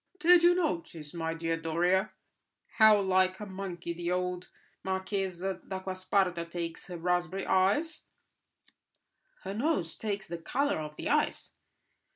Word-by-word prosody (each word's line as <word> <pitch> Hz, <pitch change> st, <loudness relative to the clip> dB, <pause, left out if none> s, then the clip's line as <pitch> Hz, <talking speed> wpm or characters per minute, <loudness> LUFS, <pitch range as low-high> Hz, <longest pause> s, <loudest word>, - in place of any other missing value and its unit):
"Did 355 Hz, 0 st, +6 dB
you 350 Hz, +1 st, +6 dB
notice, 170 Hz, -, -2 dB
my 165 Hz, -1 st, -2 dB
dear 165 Hz, 0 st, -1 dB
Doria, 175 Hz, +5 st, +1 dB, 0.7 s
how 220 Hz, -2 st, +7 dB
like 185 Hz, -1 st, +2 dB
a 210 Hz, -, -5 dB
monkey 185 Hz, -3 st, -5 dB
the 170 Hz, 0 st, -4 dB
old 180 Hz, 0 st, -2 dB, 0.4 s
Marchesa 190 Hz, -1 st, -2 dB
d'Acquasparta 185 Hz, -1 st, -1 dB
takes 170 Hz, -1 st, -5 dB
her 180 Hz, -2 st, -6 dB
raspberry 180 Hz, +2 st, -1 dB
ice?" 205 Hz, -, +1 dB, 1.4 s
"Her 195 Hz, -, -4 dB
nose 225 Hz, -, 0 dB
takes 205 Hz, -3 st, -3 dB
the 170 Hz, 0 st, -5 dB
colour 280 Hz, -, 0 dB
of 150 Hz, -1 st, -6 dB
the -, -, -5 dB
ice. -, -, 0 dB
185 Hz, 130 wpm, -30 LUFS, 170-200 Hz, 1.4 s, how